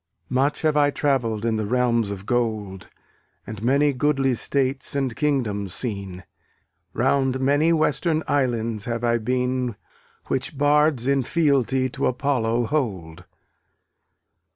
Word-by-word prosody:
Much 135 +5 0
have 155 -1 +2
I 145 -1 +4
travell'd 120 -7 0
in 115 -1 +1
the 110 - -2
realms 120 -2 +1
of 100 -1 -6
gold, 110 -6 -2 0.6
And 110 -2 -8
many 140 +4 +2
goodly 135 -1 +1
states 135 +3 -1
and 135 -4 -1
kingdoms 105 - -1
seen; 100 -6 -5 0.7
Round 135 -2 +1
many 145 +5 +2
western 160 0 +1
islands 115 -6 0
have 115 -1 -3
I 120 0 +2
been 125 0 -1 0.5
Which 135 +2 -3
bards 145 -3 +3
in 140 0 +2
fealty 135 -3 +1
to - - -1
Apollo 120 -3 0
hold. 95 - -3
125 Hz, 125 wpm, -23 LUFS, 115-140 Hz, 0.7 s, I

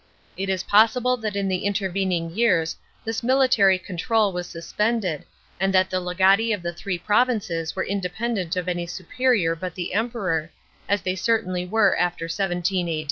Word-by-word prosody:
It 195 0 -3
is 190 -2 -1
possible 230 +4 +4
that 215 -3 -4
in 200 -1 -1
the 185 -1 -1
intervening 190 -4 -1
years 180 -8 +2 0.3
this 225 0 -2
military 250 -6 +4
control 200 +3 0
was 175 0 -4
suspended, 185 0 -2 0.3
and 195 +1 +1
that 185 0 +3
the 185 - +1
legati 190 +5 +3
of 190 - -12
the 170 0 -3
three 180 +2 -4
provinces 205 -5 0
were 190 - -1
independent 195 -1 -2
of 180 -1 -2
any 175 -1 -2
superior 185 -1 0
but 180 0 -6
the 180 -1 -4
Emperor, 195 -8 -1 0.4
as 200 -2 +1
they 185 - 0
certainly 185 -3 0
were 220 +3 +3
after 175 -1 -1
17 175 0 -1
A. 160 -2 -1
190 Hz, 165 wpm, -23 LUFS, 175-215 Hz, 0.4 s, possible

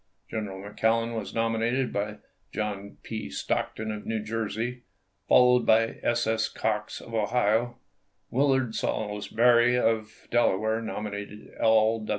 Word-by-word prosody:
General 105 -4 -4
McClellan 115 +3 0
was 110 -3 -5
nominated 115 +3 0
by 105 +1 -2 0.3
John 100 -2 -4
P. 110 -10 -5
Stockton 110 +8 -2
of 105 -1 -6
New 110 0 -2
Jersey, 115 +3 -3 0.5
fol 125 0 +6
lowed 125 - -2
by 115 +1 +3
S. 120 0 +1
S. 110 0 +1
Cox 105 -1 -2
of 115 - -12
Ohio; 115 +2 +1 0.5
Willard 130 -3 +2
Saulsbury 120 +4 +2
of 110 -2 -1
Delaware 110 -1 +2
nominated 105 -1 -6
L. 110 0 +3
110 Hz, 125 wpm, -27 LUFS, 105-115 Hz, 0.5 s, fol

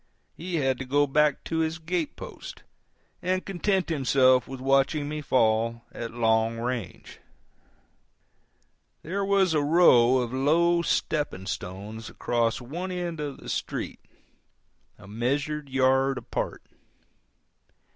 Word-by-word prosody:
He 175 +1 -5
had 135 -4 +1
to 135 - -4
go 145 +3 +3
back 150 +1 +2
to 165 - -2
his 160 0 0
gate 170 -1 -3
post, - - -10 0.6
and 185 +1 -1
content 190 0 0
himself 130 -4 +3
with 135 -1 -7
watching 135 +2 +2
me 150 0 -4
fall 115 -3 +1
at 115 - -6
long 115 -1 +1
range. 115 -6 -5 1.8
There 195 +5 -2
was 195 -3 +2
a 150 - +2
row 145 -6 +5
of 125 -1 -2
low 170 +6 +3
stepping 150 - -1
stones 95 +5 -6
across 115 -1 0
one 170 +10 -5
end 175 -3 -4
of 145 -2 -4
the - - -13
street, - - -4 1.0
a 100 - -14
measured 140 +7 -2
yard 135 0 +2
apart. - - -4
135 Hz, 125 wpm, -26 LUFS, 120-160 Hz, 1.8 s, row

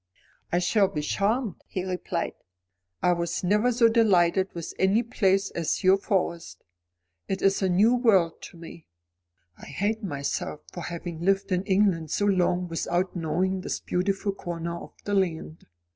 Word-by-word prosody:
"I 175 - +2
shall 195 +3 +3
be 150 -6 -4
charmed," 210 - -1
he 185 - -4
replied. 185 -1 -3 0.7
"I - - +4 0.3
never 210 +5 +2
was 245 -1 +2
so 235 -2 +6
delighted 190 -5 +3
with 170 -1 -6
any 195 +5 +3
place 195 -4 +1
as 170 +3 -2
your 185 +1 +6
Forest. 170 - -2 0.6
It 190 - -3
is 195 +1 +3
a 190 - +2
new 205 +7 +4
world 200 -9 +3
to - - -16
me. 165 0 -12 0.7
I - - -11
hate 215 +3 -2
myself 145 -2 -3
for 175 - -6
having 170 -1 -6
lived 195 +2 +1
in 180 -1 +2
England 190 -5 +2
so 205 - 0
long 180 -2 +1
without 175 +3 -1
knowing 185 +3 -1
this - - -3
beautiful 195 +3 -1
corner 170 -3 -5
of 170 - -10
the 205 - -3
land. 170 -4 -2
185 Hz, 160 wpm, -26 LUFS, 170-200 Hz, 0.7 s, so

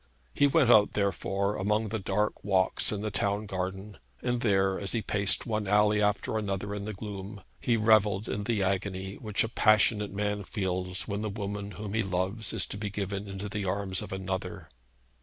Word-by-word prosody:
He 145 - +4
went 140 -3 +4
out, 105 -3 +6
therefore, 100 0 0
among 105 +3 0
the 110 +1 -2
dark 100 +2 -1
walks 95 -2 +2
in 105 -2 -2
the 110 0 -2
town 100 +2 0
garden, 95 +1 -5 0.2
and 125 -1 0
there, 95 -4 +2
as 100 -2 -2
he 115 -2 -1
paced 100 -1 +1
one 110 -3 -2
alley 105 +1 +4
after 105 +1 +1
another 100 -1 -3
in 100 -1 -4
the 110 - -4
gloom, 100 0 -7 0.2
he 120 -2 +1
revelled 105 -2 +3
in 100 0 -3
the 110 -4 +1
agony 95 0 -2
which 105 -3 0
a - - -1
passionate 110 -2 +3
man 105 0 -1
feels 90 -1 -2
when 100 -1 -2
the 110 - -2
woman 100 -1 -4
whom 105 -1 -6
he 110 - +2
loves 95 +3 -2
is - - +1
to - - -5
be 105 0 -3
given 100 0 -4
into 95 +1 -5
the 100 0 -3
arms 95 0 -1
of - - -7
another. 95 -1 -4
100 Hz, 195 wpm, -29 LUFS, 95-105 Hz, 0.2 s, out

